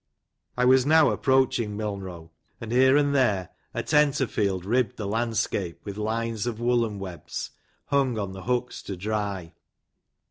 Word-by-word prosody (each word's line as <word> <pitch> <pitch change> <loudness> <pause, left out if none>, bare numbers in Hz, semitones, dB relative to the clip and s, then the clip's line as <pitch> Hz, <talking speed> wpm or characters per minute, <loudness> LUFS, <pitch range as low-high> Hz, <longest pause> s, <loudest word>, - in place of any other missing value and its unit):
I 125 - +3
was 130 0 +6
now 155 +1 +5
approaching 125 -5 +1
Milnrow, 95 -6 -5 0.3
and 115 -1 -7
here 130 +3 +5
and 145 -1 +2
there 105 -10 +2 0.2
a - - -3
tenter 150 -3 +3
field 95 -6 -1
ribbed 120 +1 +1
the 105 - -4
landscape 105 -5 -1
with 100 -2 -6
lines 115 +1 -2
of 115 -2 -3
woollen 120 -3 +1
webs, 95 -3 -6 0.3
hung 135 -4 +1
upon 100 -3 -3
the 95 -1 -8
hooks 125 +1 -1
to 95 - -6
dry. 100 -3 -3
110 Hz, 150 wpm, -26 LUFS, 100-125 Hz, 0.3 s, was